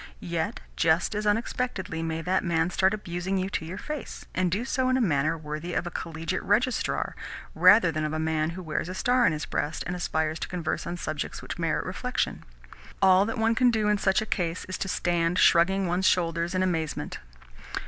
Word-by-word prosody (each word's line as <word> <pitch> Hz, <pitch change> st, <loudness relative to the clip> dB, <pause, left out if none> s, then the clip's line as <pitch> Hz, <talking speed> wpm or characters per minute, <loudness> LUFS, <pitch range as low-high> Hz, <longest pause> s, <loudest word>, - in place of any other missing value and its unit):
Yet 170 Hz, +7 st, -2 dB
just 165 Hz, +5 st, +2 dB
as 210 Hz, 0 st, -2 dB
unexpectedly 205 Hz, -5 st, -1 dB
may 165 Hz, 0 st, -3 dB
that 185 Hz, +2 st, +1 dB
man 170 Hz, 0 st, +1 dB
start 190 Hz, +1 st, +3 dB
abusing 190 Hz, -2 st, -3 dB
you 190 Hz, +1 st, -2 dB
to 160 Hz, -, -2 dB
your 175 Hz, +4 st, -6 dB
face 300 Hz, +5 st, -6 dB
and 185 Hz, -1 st, +1 dB
do 205 Hz, +8 st, -1 dB
so 260 Hz, -1 st, 0 dB
in 255 Hz, -, +3 dB
a -, -, +1 dB
manner 155 Hz, -, +1 dB
worthy 155 Hz, +3 st, -5 dB
of -, -, 0 dB
a 175 Hz, -, -4 dB
collegiate 165 Hz, -1 st, -3 dB
registrar 240 Hz, +5 st, 0 dB, 0.4 s
rather 195 Hz, -5 st, +6 dB
than 155 Hz, 0 st, -2 dB
of 155 Hz, -, -1 dB
a 155 Hz, -, -2 dB
man 160 Hz, 0 st, 0 dB
who 185 Hz, -, -6 dB
wears 160 Hz, +1 st, -3 dB
a 185 Hz, -, -5 dB
star 245 Hz, +3 st, +3 dB
on -, -, +3 dB
his 155 Hz, -1 st, -3 dB
breast 150 Hz, +2 st, -2 dB
and 175 Hz, -, -3 dB
aspires 160 Hz, -2 st, -1 dB
to -, -, -3 dB
converse 175 Hz, -3 st, -3 dB
on 175 Hz, -, -3 dB
subjects 155 Hz, -3 st, -4 dB
which -, -, -6 dB
merit -, -, 0 dB
reflection. -, -, -2 dB, 0.6 s
All 190 Hz, +1 st, +5 dB
that 225 Hz, -, -3 dB
one 225 Hz, 0 st, +2 dB
can 245 Hz, +2 st, +4 dB
do 220 Hz, -3 st, +1 dB
in 210 Hz, -1 st, +2 dB
such 195 Hz, +2 st, +2 dB
a -, -, -6 dB
case 175 Hz, -4 st, -2 dB
is 185 Hz, -, -5 dB
to -, -, -2 dB
stand 175 Hz, -1 st, 0 dB
shrugging 190 Hz, +3 st, +4 dB
one's 180 Hz, +2 st, +1 dB
shoulders 170 Hz, 0 st, +1 dB
in 185 Hz, -, +2 dB
amazement.) 165 Hz, -5 st, -2 dB
180 Hz, 210 wpm, -27 LUFS, 165-205 Hz, 0.6 s, rather